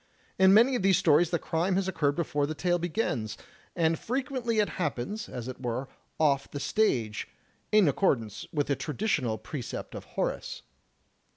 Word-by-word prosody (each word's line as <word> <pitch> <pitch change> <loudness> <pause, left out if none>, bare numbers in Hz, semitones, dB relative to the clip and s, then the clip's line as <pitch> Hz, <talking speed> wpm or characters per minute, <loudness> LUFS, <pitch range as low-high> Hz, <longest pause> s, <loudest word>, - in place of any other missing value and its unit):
In 190 0 +7
many 235 +6 +6
of 245 - 0
these 190 -2 +4
stories 160 +1 +4
the 170 - +1
crime 170 +4 0
has 190 0 0
occurred 145 -6 +1
before 145 -4 0
the 155 - -4
tale 175 +2 +1
begins; 160 - -2 0.4
and 165 -1 +2
frequently 255 -2 -2
it 210 -1 +3
happens, 165 - -3
as 120 -1 -6
it 130 0 -7
were, 125 +2 -3 0.3
off 140 -3 +2
the 145 - -5
stage, 130 - 0 0.4
in 210 -4 +6
accordance 120 - 0
with 145 -2 0
the 140 - 0
traditional 150 - -1
precept 125 +3 -6
of - - -7
Horace. - - -3
160 Hz, 165 wpm, -28 LUFS, 135-195 Hz, 0.4 s, In